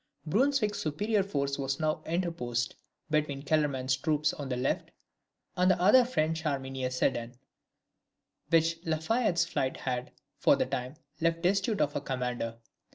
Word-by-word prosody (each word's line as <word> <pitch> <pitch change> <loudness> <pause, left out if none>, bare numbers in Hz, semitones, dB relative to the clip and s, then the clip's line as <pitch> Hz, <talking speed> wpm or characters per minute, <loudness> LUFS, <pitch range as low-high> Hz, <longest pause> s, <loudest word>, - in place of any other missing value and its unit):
Brunswick's 220 - +2
superior 205 +8 0
force 140 -7 -2
was 135 0 -1
now 155 0 0
interposed 160 -9 -1 0.4
between 145 -3 0
Kellerman's 140 -4 +1
troops 150 +2 +1
on 140 -2 -6
the 125 - -1
left, 130 +2 -1 0.7
and 180 +1 +3
the 185 - +3
other 210 +8 +6
French 160 -9 0
army 135 -4 -2
near 130 -1 -2
Sedan, 120 -1 -1 1.1
which 165 0 +3
La 160 -2 0
Fayette's 185 +1 +1
flight 130 0 -1
had, 125 -1 -3 0.3
for - - +5
the - - +1
time, 130 +1 -4 0.2
left 165 0 +1
destitute 195 +3 +2
of 145 - +1
a - - -1
commander. 125 -3 -3
155 Hz, 150 wpm, -30 LUFS, 130-175 Hz, 1.1 s, other